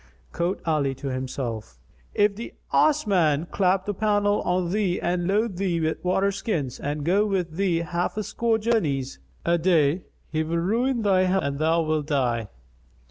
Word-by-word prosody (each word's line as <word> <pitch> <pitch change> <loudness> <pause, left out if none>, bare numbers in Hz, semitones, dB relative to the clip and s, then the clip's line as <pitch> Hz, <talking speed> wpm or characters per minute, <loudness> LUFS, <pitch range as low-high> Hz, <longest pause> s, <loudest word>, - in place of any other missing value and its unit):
Quoth 175 +1 -2
Ali 145 -4 +1
to 135 +1 -5
himself, 130 -4 -4 0.4
"If 205 -1 +3
the 230 +3 -8 0.2
Ass 305 -2 +3
man 165 -6 +2
clap 190 0 +2
the 205 - -2
pannel 205 0 +1
on 180 -1 0
thee 195 -3 0
and 175 0 -1
load 205 0 0
thee 180 -3 0
with 160 0 -2
water 190 +2 +2
skins 160 - -3
and 145 0 -3
go 195 +5 +3
with 185 -5 -1
thee 175 -1 0
half 175 +3 -2
a 215 - -1
score 230 +2 0
journeys 165 - -1 0.3
a 170 0 +2
day 165 -1 +3 0.3
he 155 - 0
will 160 +2 -1
ruin 230 +7 0
thy 190 -2 +3
health 190 +1 +1
and 140 0 -2
thou 165 +2 +2
wilt 155 -2 -1
die." 120 -7 0
175 Hz, 175 wpm, -25 LUFS, 155-200 Hz, 0.4 s, If